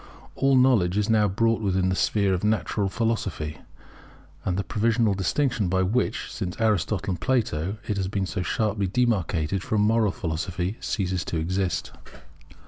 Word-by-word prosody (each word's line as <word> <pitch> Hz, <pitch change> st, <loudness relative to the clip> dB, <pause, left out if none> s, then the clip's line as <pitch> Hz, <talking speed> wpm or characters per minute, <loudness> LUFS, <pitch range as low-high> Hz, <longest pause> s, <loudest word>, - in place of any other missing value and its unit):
All 135 Hz, 0 st, +2 dB
knowledge 115 Hz, -8 st, +4 dB
is 105 Hz, +2 st, +1 dB
now 105 Hz, -2 st, +4 dB
brought 115 Hz, +4 st, +1 dB
within 95 Hz, -2 st, +1 dB
the 95 Hz, -, +1 dB
sphere 100 Hz, 0 st, +2 dB
of 90 Hz, -, -2 dB
Natural 105 Hz, -2 st, 0 dB
Philosophy; 95 Hz, -9 st, -2 dB, 0.8 s
and 90 Hz, -1 st, -1 dB
the 100 Hz, -, 0 dB
provisional 115 Hz, 0 st, +1 dB
distinction 110 Hz, -, 0 dB
by 95 Hz, +1 st, +2 dB
which, 110 Hz, +7 st, -1 dB
since 90 Hz, 0 st, -4 dB
Aristotle 105 Hz, -3 st, +1 dB
and 85 Hz, -2 st, -4 dB
Plato, 105 Hz, -7 st, 0 dB
it 105 Hz, -, -1 dB
has 95 Hz, -2 st, -1 dB
been 100 Hz, 0 st, -1 dB
so 95 Hz, 0 st, -3 dB
sharply 100 Hz, +1 st, 0 dB
demarcated 95 Hz, -6 st, 0 dB
from 105 Hz, +1 st, 0 dB
Moral 110 Hz, -1 st, +3 dB
Philosophy, 90 Hz, -1 st, -3 dB
ceases 95 Hz, -4 st, -2 dB
to 85 Hz, -, -3 dB
exist. 90 Hz, -1 st, -1 dB
100 Hz, 155 wpm, -25 LUFS, 90-110 Hz, 0.8 s, knowledge